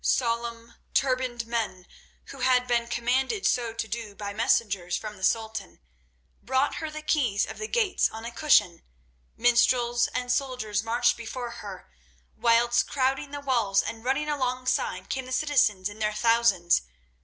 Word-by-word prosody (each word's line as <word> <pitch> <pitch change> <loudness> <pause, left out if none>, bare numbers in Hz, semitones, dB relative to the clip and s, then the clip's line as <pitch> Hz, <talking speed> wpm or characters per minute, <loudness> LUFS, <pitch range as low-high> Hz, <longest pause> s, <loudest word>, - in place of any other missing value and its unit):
Solemn, 235 -1 -1 0.2
turbaned 255 -3 0
men, 220 -6 -3 0.5
who - - -10
had 250 -1 +3
been 240 -1 0
commanded 260 - 0
so 235 -2 +1
to 225 0 -4
do 215 -1 -6
by 200 -1 -5
messengers 200 -5 +1
from 215 -1 -7
the 190 - -13
Sultan, 220 - -1 0.6
brought 260 +4 0
her 315 - -3
the 305 0 -8
keys 245 -11 +1
of - - -9
the 430 - -3
gates 435 -5 +1
on 225 +1 -8
a 235 - -5
cushion, 235 - +3 0.6
minstrels 240 0 +3
and 250 0 -3
soldiers 250 -7 -1
marched 240 +2 +2
before 235 +1 -6
her, 235 - -9 0.5
whilst 240 +1 +3
crowding 270 +1 0
the 285 0 -6
walls 230 -8 +2
and 225 0 -6
running 270 +4 0
alongside 255 -3 -1
came 260 -1 -4
the - - -9
citizens 255 -9 +2
in 205 +1 -9
their 210 -1 0
thousands. 230 -6 +3
235 Hz, 155 wpm, -27 LUFS, 220-255 Hz, 0.6 s, had